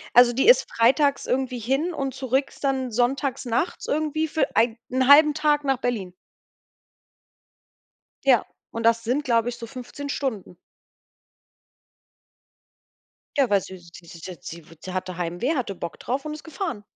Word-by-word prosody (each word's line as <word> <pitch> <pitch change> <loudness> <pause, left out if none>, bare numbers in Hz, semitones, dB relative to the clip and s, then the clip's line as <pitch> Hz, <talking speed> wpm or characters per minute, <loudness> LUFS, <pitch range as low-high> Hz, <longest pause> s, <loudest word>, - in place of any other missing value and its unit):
Also 245 0 +7
die 265 - +1
ist - - +6
freitags 275 +5 +2
irgendwie 255 -1 -1
hin 270 +10 0
und 270 -4 -3
zurück 265 +1 0
ist - - -15
dann 265 -2 0
sonntags 250 +3 0
nachts 240 +8 -2
irgendwie 310 +1 0
für 315 +1 +1
ei 225 0 +3
1/2 285 +4 +6
Tag 300 -1 +2
nach 270 -1 +2
Berlin. 210 -8 -3 2.1
Ja, 255 -4 +4 0.3
und 230 0 -5
das 230 0 +3
sind, 260 +6 0
glaube 235 -1 +2
ich, 240 - -4
so 235 - -8
15 260 +3 -8
Stunden. 220 -12 -4 2.8
Ja, 270 -4 +4
weil 200 -1 +3
sie 185 +1 -10
sie 170 0 -15
sie 165 - -12
sie 175 +2 -8
sie 165 +2 -10
wu 165 - -15
sie 185 - -7
hatte 185 -1 -4
Heimweh, 175 - -2
hatte 240 -8 -2
Bock 170 -1 -7
drauf 265 +4 -3
und 305 - -4
ist 305 - -10
gefahren. 320 - -5
250 Hz, 160 wpm, -24 LUFS, 225-280 Hz, 2.8 s, Also